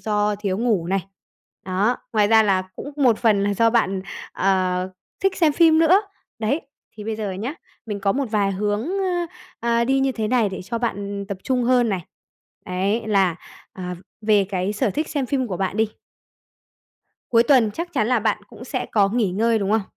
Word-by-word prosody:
do 210 -1 +1
thiếu 200 -2 -2
ngủ 220 -8 +1
này. 195 +1 -1 0.6
Đó, 200 +6 +1 0.2
ngoài 210 -2 +3
ra 220 0 +6
là 195 -3 +2
cũng 285 - -7
một 250 -6 +3
phần 215 -4 +3
là 200 0 +1
do 230 +3 +3
bạn, 195 -5 +1 0.3
ờ, 185 -1 +1 0.3
thích 390 0 +1
xem 320 -4 +3
phim 320 0 +5
nữa. 345 +5 +5 0.4
Đấy, 225 +8 0 0.4
thì 210 - -8
bây 220 0 -3
giờ 210 -3 -3
nhá, 220 +10 -4 0.3
mình 205 -2 -4
có 195 0 +2
một 280 0 -1
vài 200 -2 +1
hướng, 205 +2 -1 0.2
ơ, 360 -3 0 0.3
à, 235 0 +2
đi 270 +2 +2
như 270 -1 +1
thế 220 -3 -2
này 240 -3 +2
để 190 -1 -6
cho 230 +5 -4
bạn 200 -3 -3
tập 200 -2 -4
trung 255 -2 0
hơn 245 -1 +3
này. 195 -4 -1 0.7
Đấy, 195 +5 0
là, 195 -5 +2 0.4
à, 180 -1 -5 0.3
về 210 -2 +3
cái 190 0 -2
sở 210 0 0
thích 305 +8 -2
xem 280 -4 -2
phim 260 -1 0
của 185 -6 -4
bạn 195 0 -2
đi 220 0 +3 1.4
Cuối 230 -1 +5
tuần 240 -3 +4
chắc 340 +9 -5
chắn 225 -8 +1
là 250 -1 +3
bạn 215 0 +1
cũng 245 - -11
sẽ 255 0 -3
có 200 -3 +4
nghỉ 215 -3 +1
ngơi, 225 +3 +2
đúng 200 -1 -1
không? 220 0 +3
215 Hz, 200 wpm, -22 LUFS, 195-245 Hz, 1.4 s, ra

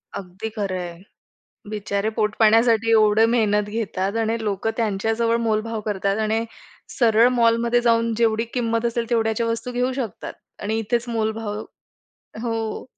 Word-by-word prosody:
अगदी 190 +4 -6
खरं 195 -3 -2
आहे. 175 -1 -7 0.7
बिचारे 205 0 -2
पोटपाण्यासाठी 225 +1 +3
एवढं 215 0 +5
मेहनत 210 -3 +1
घेतात 205 -2 -2
आणि 225 +1 0
लोकं 205 +2 -1
त्यांच्या 220 -1 0
जवळ 230 0 +2
मोलभाव 220 0 -1
करतात 200 0 -1
आणि 220 +1 0 0.5
सरळ 230 0 +5
मॉलमध्ये 235 +1 +3
जाऊन 230 -1 +2
जेवढी 225 -1 +2
किंमत 230 -1 0
असेल, 235 0 -2
तेवढ्याच्या 225 0 +1
वस्तू 230 +2 -3
घेऊ 250 +1 0
शकतात 250 -7 -5 0.3
आणि 220 +2 -1
इथेच 235 +2 -1
मोलभाव 220 -2 -2 0.8
हो. 225 -2 -3
225 Hz, 135 wpm, -22 LUFS, 210-230 Hz, 0.8 s, एवढं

